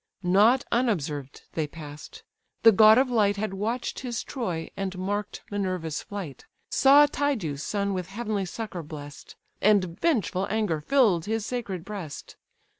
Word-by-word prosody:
Not 210 +8 +4
unobserved 155 - -1
they 155 -2 -1
pass'd: 150 - -10 0.4
the 225 - +9
god 215 +2 +7
of 260 0 +3
light 205 -3 +2
Had 210 -1 -2
watch'd 225 +5 -3
his 245 -2 -4
Troy, 180 -11 -4
and 190 -1 -4
mark'd 205 +3 -3
Minerva's 185 -6 -2
flight, 190 -9 -7 0.3
Saw 285 +2 +7
Tydeus' 250 - -1
son 200 +5 -1
with 180 -2 -3
heavenly 210 -1 -3
succour 195 -1 -5
bless'd, 145 -2 -10 0.3
And 195 -3 +2
vengeful 205 - +1
anger 205 -8 0
fill'd 205 - +3
his 220 0 -2
sacred 205 -9 -4
breast. 190 -8 -7
200 Hz, 140 wpm, -26 LUFS, 170-225 Hz, 0.4 s, the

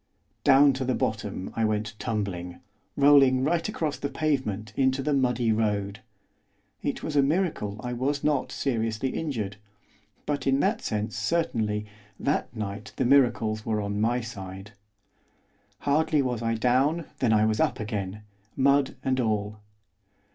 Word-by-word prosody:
Down 140 0 +6
to 130 0 -3
the 130 0 0
bottom 105 -3 -3
I 115 - 0
went 110 0 0
tumbling, 100 -6 -3 0.4
rolling 140 -2 +6
right 165 +6 +1
across 155 -8 -2
the 140 - -2
pavement 130 -9 -1
into 130 0 +1
the 150 - +1
muddy 125 -4 +2
road. 105 -2 0 0.8
It - - -3
was 155 - -3
a 140 - +6
miracle 140 - 0
I 125 0 -3
was 140 +4 -1
not 150 -2 +1
seriously 115 -1 -1
injured, 115 -10 -3 0.7
but 145 -2 -2
in 135 0 +3
that - - +1
sense, 105 +1 -2
certainly, 110 -11 0 0.3
that 140 +2 0
night 105 -2 -5
the - - 0
miracles 120 -5 +3
were 110 -1 -1
on 100 0 -2
my 120 +3 +1
side. 95 -3 -8 1.1
Hardly 150 0 +2
was 125 -3 -2
I 115 0 0
down, 130 +8 +2
than 120 -4 +2
I 110 0 +4
was 110 0 0
up - - +1
again, 105 -1 -4 0.3
mud 140 +1 +3
and 130 -1 +1
all. 105 -2 -1
120 Hz, 145 wpm, -27 LUFS, 105-140 Hz, 1.1 s, Down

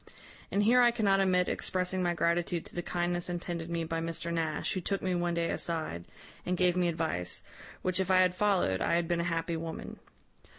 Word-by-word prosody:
And 205 - +2
here 245 +4 +6
I 240 - +7
cannot 210 -5 +2
omit 185 -2 +3
expressing 185 0 -1
my 175 -1 +1
gratitude 170 0 0
to - - -14
the 175 - -2
kindness 175 0 -1
intended 170 -1 -4
me 170 -1 -1
by 165 0 -2
Mr 165 0 -3
Nash, 160 -2 -1
who 185 - -2
took 195 +2 -2
me 185 -1 0
one 175 -1 0
day 170 0 0
aside, 155 - -3 0.4
and 180 0 -1
gave 180 -1 +3
me 180 -1 +2
advice, 160 - -2 0.4
which 185 0 +1
if 190 -1 0
I 185 0 +6
had 180 -1 +3
followed, 185 - +1
I 170 - +2
had 170 -1 +1
been 170 0 +1
a - - -2
happy 165 0 -1
woman. 165 0 -6
175 Hz, 210 wpm, -31 LUFS, 165-185 Hz, 0.4 s, I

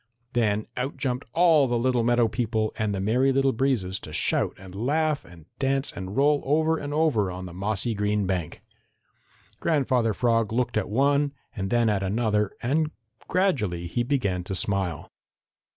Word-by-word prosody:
Then 110 -3 +1
out 130 +3 -3
jumped 130 -3 -2
all 165 -5 +5
the 120 -1 0
little 125 0 +1
meadow 120 0 +3
people 110 -1 -1
and 110 -1 -1
the - - -3
Merry 125 +7 +2
Little 135 0 +3
Breezes 110 -8 0
to - - -10
shout - - 0
and 95 -1 -12
laugh 150 +8 0
and 85 -3 -15
dance 135 0 0
and 95 +3 -7
roll 145 +1 +4
over 160 +3 +2
and 145 0 -5
over 145 -10 +2
on 90 0 -6
the 90 - -9
mossy 100 +5 -2
green 105 0 0
bank. 90 -4 -3 1.0
Grandfather 130 -8 +1
Frog 115 -2 +1
looked 120 +2 0
at 105 -3 0
one 140 +5 +2 0.2
and 95 -2 -3
then 120 +1 +2
at 105 -3 +1
another 105 +1 +1
and 150 +5 +1 0.4
gradually 120 - 0
he 85 +8 -1
began 120 -9 0
to 95 - -3
smile. 95 -5 -1
115 Hz, 170 wpm, -26 LUFS, 100-135 Hz, 1.0 s, all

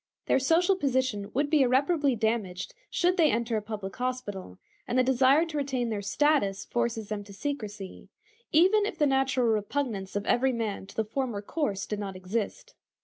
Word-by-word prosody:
Their - - +3
social 335 +8 +3
position 260 - 0
would 285 +2 +2
be 305 -3 +5
irreparably 275 +2 +3
damaged 215 -5 -2 0.2
should 360 +2 +1
they 320 -3 +5
enter 235 -1 0
a 215 - 0
public 210 -2 -6
hospital, 245 - -4 0.3
and 245 - -1
the 255 - +5
desire 265 +5 +4
to 320 -2 -5
retain 265 -4 -1
their 210 -2 -2
status 205 -4 +1
forces 235 -3 -2
them 210 -1 -3
to 200 - -13
secrecy, 210 -6 -6 0.4
even 385 +6 +4
if 435 - -5
the 300 - +3
natural 270 -2 +2
repugnance 215 -2 -1
of 205 0 -2
every 260 +1 +2
man 215 -4 -3
to - - -14
the 220 - 0
former 225 -2 -3
course 205 -6 -2
did 210 - -4
not 195 -2 -5
exist. 195 +3 -4
240 Hz, 180 wpm, -28 LUFS, 205-280 Hz, 0.4 s, be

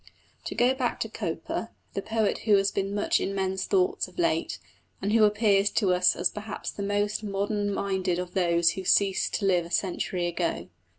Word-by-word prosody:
To - - -4
go 245 +2 +3
back 255 -2 -2
to 225 - -2
Cowper 210 +3 -4 0.2
the 195 - -2
poet 220 0 0
who 210 -2 +5
has 195 0 +2
been 195 +1 -2
much 205 - +1
in 195 - -2
men's 190 -1 -1
thoughts 375 -1 +1
of - - -18
late, 335 -2 0 0.4
and 205 +2 -1
who 225 -1 +6
appears 205 -1 +3
to 195 -5 +2
us 180 0 +3
as - - +1
perhaps 210 0 -6
the - - -7
most 205 +1 0
modern 205 0 -1
minded 190 -3 -1
of 180 0 -5
those 170 -2 +3
who 190 - -6
ceased 195 +1 +2
to 205 - -1
live 180 -3 +3
a - - -14
century 180 -1 -1
ago. 170 - -2
200 Hz, 195 wpm, -27 LUFS, 185-210 Hz, 0.4 s, who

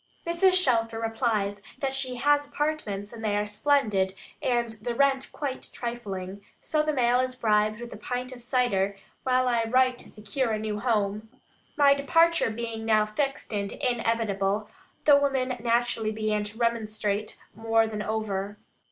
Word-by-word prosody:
Mrs. 340 +3 +3
Shelfer 230 -11 +2
replies 225 -3 -1 0.2
that 270 -1 -2
"she 265 -2 -1
has 290 +3 +2
apartments, 285 -9 -3
and 225 -1 -9
they 205 -1 +1
are 210 - 0
splendid, 210 -4 +1 0.3
and 240 -2 0
the 225 +2 -5
rent 270 0 +2
quite 275 -3 -4
trifling;" 200 -5 -5 0.2
so 305 -1 0
the 305 0 0
mail 250 -3 +3
is 255 0 0
bribed 215 -2 +2
with 240 0 -7
a - - -8
pint 250 +1 -4
of 250 -1 -9
cider, 225 -6 +1 0.2
while 255 0 +2
I 235 -2 +2
write 255 +1 +3
to - - -9
secure 220 +4 -2
a - - 0
new 215 -1 -3
home. 215 -2 0 0.5
My 285 -1 +6
departure 330 +2 +3
being 225 0 -4
now 215 -1 +3
fixed 270 +4 -3
and 200 -1 -2
inevitable, 220 -4 0 0.3
the 290 -2 +8
women 270 -2 +1
naturally 235 -2 +1
began 215 -1 -1
to 210 +2 -7
remonstrate 215 -3 -1 0.2
more 225 0 +2
than 215 -1 -4
over. 205 -2 -3
230 Hz, 160 wpm, -27 LUFS, 210-255 Hz, 0.5 s, the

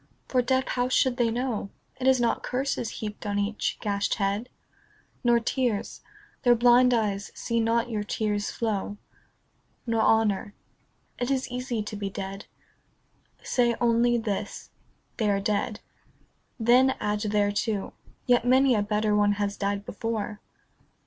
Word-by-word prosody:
For, 255 - +2
deaf, 260 +1 +1
how 245 0 0
should 255 -1 +2
they 240 -2 +2
know 235 -3 -2 0.3
It 260 - 0
is 260 -1 +5
not 235 -1 +1
curses 255 -2 -2
heaped 210 -1 -6
on 205 0 -1
each 205 +1 -1
gashed 200 -2 0
head? 200 +4 -1 0.7
Nor 240 -1 +4
tears. 235 -2 -2 0.4
Their 245 -2 +5
blind 245 +1 +5
eyes 210 -4 0
see 235 -1 -1
not 230 +1 +1
your 215 -3 -2
tears 205 -1 -1
flow. 205 -2 -2 0.9
Nor 230 -2 +1
honour. 215 -2 +2 0.6
It 245 - -1
is 265 -1 0
easy 245 -3 -2
to 210 - -6
be 200 -1 -3
dead. 195 0 -6 1.0
Say 240 -2 +2
only 240 0 +3
this, 215 -4 -4 0.2
" - - -42
They 215 -3 +1
are 200 -1 +2
dead." 210 +1 -1 0.8
Then 250 +3 +4
add 210 0 -1
thereto, 205 0 0 0.2
" - - -31
Yet 245 -2 +4
many 260 +1 +4
a 210 - +2
better 210 0 +1
one 205 0 +3
has 205 0 -2
died 200 0 -2
before." 215 -1 -4
225 Hz, 150 wpm, -26 LUFS, 205-245 Hz, 1.0 s, is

